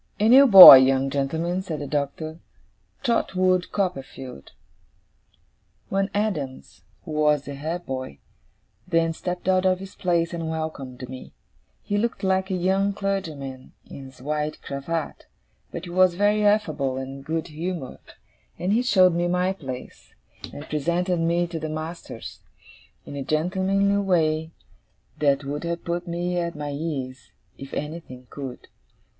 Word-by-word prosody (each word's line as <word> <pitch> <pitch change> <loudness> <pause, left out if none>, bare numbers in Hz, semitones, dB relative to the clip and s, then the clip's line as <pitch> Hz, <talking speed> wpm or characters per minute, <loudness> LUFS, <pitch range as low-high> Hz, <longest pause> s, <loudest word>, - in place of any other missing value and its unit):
'A 215 +2 +3
new 275 +3 +8
boy, 190 - +13
young 135 +1 +2
gentlemen,' 160 +6 -1
said 170 -5 -5
the 145 - -5
Doctor; 150 +3 -3 0.6
'Trotwood 185 -7 +1
Copperfield.' 135 - -5 1.4
One 195 +1 0
Adams, 190 -11 -3 0.2
who 160 - -7
was 150 -1 +2
the 140 - -6
head 160 +5 -5
boy, 130 - -5 0.7
then 165 -2 +1
stepped 180 +2 -5
out 185 0 +3
of 185 -1 +2
his 195 +1 -10
place 170 -2 0
and 165 -1 -4
welcomed 140 -6 -5
me. 130 0 -10 0.5
He 205 0 -1
looked 235 -1 -2
like 190 0 +1
a 190 - -1
young 190 +3 +1
clergyman, 155 -10 -5
in 135 - -10
his 130 -1 -14
white 150 +1 -2
cravat, 145 +3 -5 0.4
but 170 - -6
he 175 - -8
was 185 -1 +3
very 205 +2 +2
affable 155 -11 +1
and 135 +1 -7
good 160 +3 -3
humoured; 160 -2 -5 0.6
and 185 +3 -1
he 230 - +3
showed 185 -8 +4
me 175 +1 0
my 180 +2 0
place, 130 -8 -9 0.4
and 145 - -9
presented 170 +4 -1
me 170 +1 +1
to 170 -1 -6
the 155 0 -4
masters, 160 +2 -7 0.7
in - - -8
a 140 - -4
gentlemanly 190 +6 +1
way 160 -5 +1 0.7
that 140 -1 +2
would 145 +3 -4
have 170 0 -4
put 175 +1 -3
me 175 +1 -2
at 170 -1 -3
my 145 -1 -5
ease, 135 -5 -5 0.3
if 135 0 -9
anything 150 -4 -7
could. 135 -3 -8
165 Hz, 145 wpm, -24 LUFS, 140-185 Hz, 1.4 s, boy